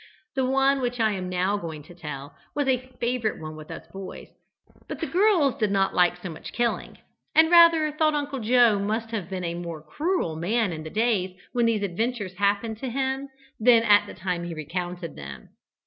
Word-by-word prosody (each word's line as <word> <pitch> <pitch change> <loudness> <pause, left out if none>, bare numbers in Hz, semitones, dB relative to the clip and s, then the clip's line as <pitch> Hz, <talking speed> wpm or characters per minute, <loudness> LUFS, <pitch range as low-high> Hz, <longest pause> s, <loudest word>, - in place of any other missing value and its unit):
The 265 -1 +1
one 270 +1 +3
which 245 -1 -2
I 220 -1 +3
am 185 -2 -4
now 185 +3 +1
going 160 -6 -6
to 165 - -14
tell 150 -4 -8 0.2
was 290 -2 0
a 255 0 0
favourite 235 -2 -1
one 155 0 -7
with 155 0 -11
us - - -8
boys, 195 -1 -8 0.6
but - - -6
the 330 - -1
girls 345 - +3
did 215 -2 +2
not 195 -1 +1
like 180 0 +3
so 180 - -7
much 155 - -9
killing, 240 -1 -1 0.4
and 320 +1 +6
rather 335 -3 +7
thought 305 0 +2
Uncle 285 -2 -2
Joe 235 -2 +4
must 220 +3 -2
have 200 -6 -4
been 185 -2 -4
a 170 -1 -2
more 170 -3 -6
cruel 315 - -1
man 200 +4 0
in 155 - -6
the 160 - -7
days 195 -3 0
when 240 -2 +2
these 220 -3 +1
adventures 205 +1 -2
happened 205 +2 0
to 260 - -3
him 265 +2 -2 0.3
than 230 0 +6
at 205 -2 +5
the - - -9
time 180 -1 -3
he 175 -1 -5
recounted 175 +2 -5
them. 70 -3 -9
210 Hz, 200 wpm, -25 LUFS, 175-255 Hz, 0.6 s, rather